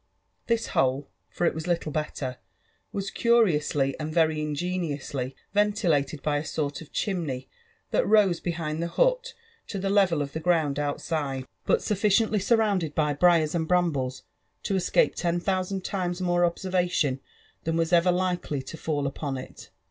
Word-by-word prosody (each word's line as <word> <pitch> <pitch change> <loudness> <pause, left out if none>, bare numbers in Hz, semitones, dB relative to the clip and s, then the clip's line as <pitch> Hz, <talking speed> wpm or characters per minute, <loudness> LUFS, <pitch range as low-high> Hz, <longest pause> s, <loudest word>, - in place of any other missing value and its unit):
This 230 -1 0
hole, 135 +2 +1 0.2
for 175 - -1
it - - +2
was 160 0 -5
lillle 165 -3 -1
bett^i 135 -4 -3 0.5
was 195 -1 -3
euriously 155 - +3
and 155 0 -3
very 160 -2 +2
ingeniously 150 -4 -3 0.2
ventilated 180 -9 +1
by 145 -1 +1
a - - -3
aort 150 -2 -3
of 160 - -12
chimney 155 -10 -2 0.4
that - - +2
rose 200 -6 +4
behind 165 -2 -3
the 170 - -1
hut - - +1 0.3
to 200 - -4
the 195 0 -1
level 185 -7 +3
of 140 - -8
the 160 - -3
ground 160 -4 +1
outside^ 145 -2 -2 0.2
but - - +3
aufficiently 210 +1 +2
surrounded 200 -8 +1
by 150 -2 +2
briars 160 0 +4
and 165 -2 -1
brambles 145 -8 0 0.4
to 195 - -1
escape 185 - +2
ten 175 0 0
thou« 185 +1 0
pand 190 0 -4
times 180 -3 -2
nsore 175 -1 +2
observation 175 -6 0 0.4
than 165 0 -1
was 165 +1 0
ever 175 +1 +5
likely 180 -6 -1
to 150 +5 -8
fall 145 -3 -2
upon 140 0 -3
it. 130 - -10
170 Hz, 160 wpm, -26 LUFS, 145-185 Hz, 0.5 s, ever